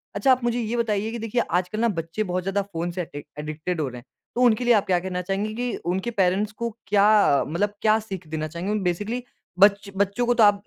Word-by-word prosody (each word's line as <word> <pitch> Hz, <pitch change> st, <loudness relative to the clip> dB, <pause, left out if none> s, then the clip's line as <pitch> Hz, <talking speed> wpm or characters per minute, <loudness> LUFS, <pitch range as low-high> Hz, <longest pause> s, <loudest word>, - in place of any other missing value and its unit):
अच्छा 205 Hz, +7 st, +3 dB
आप 255 Hz, -1 st, +3 dB
मुझे 240 Hz, 0 st, 0 dB
ये 235 Hz, +1 st, -2 dB
बताइए 220 Hz, -2 st, 0 dB
कि 235 Hz, -, -5 dB
देखिए 225 Hz, +2 st, 0 dB
आजकल 180 Hz, +4 st, 0 dB
ना 235 Hz, -, +3 dB
बच्चे 165 Hz, +6 st, -3 dB
बहुत 180 Hz, -2 st, -2 dB
ज़्यादा 195 Hz, +2 st, 0 dB
फ़ोन 175 Hz, -3 st, -4 dB
से 180 Hz, +1 st, -3 dB
एडि 145 Hz, -4 st, -7 dB, 0.2 s
एडिक्टेड 155 Hz, +3 st, -3 dB
हो 145 Hz, -, -1 dB
रहे 125 Hz, -, -9 dB
हैं। 120 Hz, -, -18 dB, 0.3 s
तो 245 Hz, -, 0 dB
उनके 245 Hz, -1 st, +4 dB
लिए 240 Hz, -, +6 dB
आप 205 Hz, -3 st, +3 dB
क्या 180 Hz, -2 st, +3 dB
कहना 180 Hz, 0 st, -3 dB
चाहेंगे? 195 Hz, +4 st, -2 dB
कि 245 Hz, +1 st, -2 dB
उनके 190 Hz, +6 st, -2 dB
पेरेंट्स 200 Hz, 0 st, +1 dB
को 235 Hz, +2 st, -3 dB, 0.2 s
क्या 205 Hz, -6 st, +5 dB
मतलब 200 Hz, +7 st, -1 dB
क्या 215 Hz, 0 st, +4 dB
सीख 190 Hz, -6 st, -7 dB
देना 155 Hz, 0 st, -3 dB
चाहेंगे? 170 Hz, +6 st, -3 dB
बेसिकली 205 Hz, +8 st, -2 dB, 0.4 s
बच्च 200 Hz, 0 st, +5 dB
बच्चों 200 Hz, +5 st, +1 dB
को 245 Hz, -, +3 dB
तो 235 Hz, -, +4 dB
आप 205 Hz, -1 st, +4 dB
200 Hz, 235 wpm, -24 LUFS, 180-220 Hz, 0.4 s, लिए